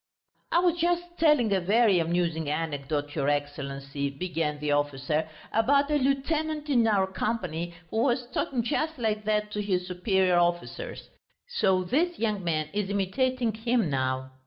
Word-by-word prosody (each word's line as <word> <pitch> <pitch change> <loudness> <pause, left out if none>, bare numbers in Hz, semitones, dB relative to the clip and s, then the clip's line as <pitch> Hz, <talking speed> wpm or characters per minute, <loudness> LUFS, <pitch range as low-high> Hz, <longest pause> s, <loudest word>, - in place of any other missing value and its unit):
"I - - +3
was 345 -1 +3
just 345 +1 +1 0.2
telling 300 -10 +4
a 190 - +2
very 205 0 +4
amusing 165 -2 0
anecdote, 145 -1 -2
your 145 -2 0
Excellency!" 140 -1 -3
began 155 0 -2
the 150 0 -2
officer, 145 +2 0 0.2
"about 280 +6 +3
a 295 - +3
lieutenant 300 +3 0
in 235 -4 +4
our 200 -3 +3
company 180 -4 -3 0.2
who - - -2
was 245 +1 +2
talking 245 -1 -1
just 310 +7 -1
like 215 -3 -1
that 210 0 0
to 210 - -2
his 185 -3 0
superior 185 0 +2
officers; 175 - -2 0.4
so 190 - +2
this 330 - 0
young 215 -4 -1
man 155 -3 -1
is 205 -1 -1
imitating 230 +5 0
him 225 -5 0
now. 130 0 -1
195 Hz, 155 wpm, -27 LUFS, 155-245 Hz, 0.4 s, telling